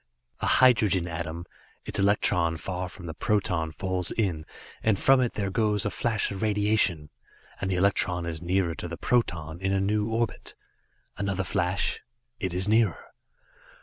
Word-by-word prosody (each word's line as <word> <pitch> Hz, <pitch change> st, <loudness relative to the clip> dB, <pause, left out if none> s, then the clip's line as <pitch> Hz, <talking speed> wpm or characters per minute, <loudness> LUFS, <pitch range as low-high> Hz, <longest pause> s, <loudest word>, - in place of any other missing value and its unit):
A -, -, -1 dB
hydrogen 105 Hz, -8 st, +4 dB
atom 85 Hz, 0 st, -5 dB, 0.4 s
its -, -, -2 dB
electron 90 Hz, -4 st, +2 dB
far 90 Hz, +2 st, -4 dB
from 90 Hz, 0 st, -11 dB
the 80 Hz, -, -5 dB
proton 90 Hz, -4 st, 0 dB
falls 90 Hz, +2 st, -1 dB
in, 85 Hz, -8 st, -1 dB, 0.3 s
and 110 Hz, -3 st, +2 dB
from 135 Hz, +4 st, +5 dB
it 120 Hz, -, 0 dB
there 100 Hz, -2 st, -2 dB
goes 105 Hz, -1 st, +1 dB
a 105 Hz, -, 0 dB
flash 110 Hz, -4 st, 0 dB
of 95 Hz, -, -5 dB
radiation, 105 Hz, -7 st, +1 dB, 0.5 s
and 95 Hz, -, -1 dB
the 95 Hz, -, 0 dB
electron 90 Hz, -2 st, +1 dB
is 80 Hz, -1 st, -4 dB
nearer 90 Hz, -1 st, 0 dB
to 85 Hz, -, -6 dB
the 85 Hz, 0 st, -6 dB
proton, 85 Hz, -9 st, -1 dB
in 95 Hz, 0 st, 0 dB
a 95 Hz, -, +2 dB
new 105 Hz, +2 st, 0 dB
orbit. 115 Hz, +1 st, -2 dB, 0.6 s
Another 100 Hz, -1 st, -1 dB
flash 90 Hz, +1 st, 0 dB, 0.4 s
it 95 Hz, -5 st, -2 dB
is 90 Hz, +3 st, -1 dB
nearer. 110 Hz, -4 st, +1 dB
95 Hz, 160 wpm, -27 LUFS, 85-105 Hz, 0.6 s, from